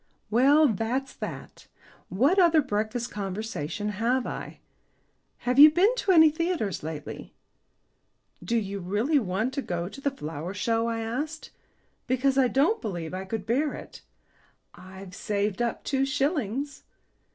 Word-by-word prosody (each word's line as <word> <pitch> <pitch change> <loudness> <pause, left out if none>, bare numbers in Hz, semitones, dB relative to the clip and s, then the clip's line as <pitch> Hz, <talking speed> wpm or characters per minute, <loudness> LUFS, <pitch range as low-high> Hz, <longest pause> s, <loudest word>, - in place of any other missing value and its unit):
"Well, 280 +7 +5
that's 235 +4 -2
that. - - -8 0.4
What 275 - +3
other 330 -4 +5
breakfast 220 +1 -2
conversation 205 -2 -4
have 235 +5 0
I? - - -6 0.9
Have 250 +2 +2
you 300 +2 +12
been 365 +9 +3
to 395 - +1
any 320 -3 +7
theatres 315 - -2
lately?" 155 -1 -7 1.1
"Do 235 - 0
you 200 -2 -3
really 210 - +1
want 215 +4 -2
to 275 - -2
go 175 -6 -3
to 275 +8 -10
the 280 - +1
Flower 165 - -6
Show?" 230 +3 0
I 230 -1 -2
asked. 295 +8 -4 0.6
"Because 260 +1 +1
I 265 -2 +4
don't 285 - +2
believe 175 -7 -5
I 190 +1 -4
could 195 0 -4
bear 275 +7 0
it." - - -11 0.7
"I've 190 0 -12
saved 205 +2 -2
up 235 -1 -2
two 270 -1 0
shillings." 275 - -1
235 Hz, 140 wpm, -27 LUFS, 200-280 Hz, 1.1 s, you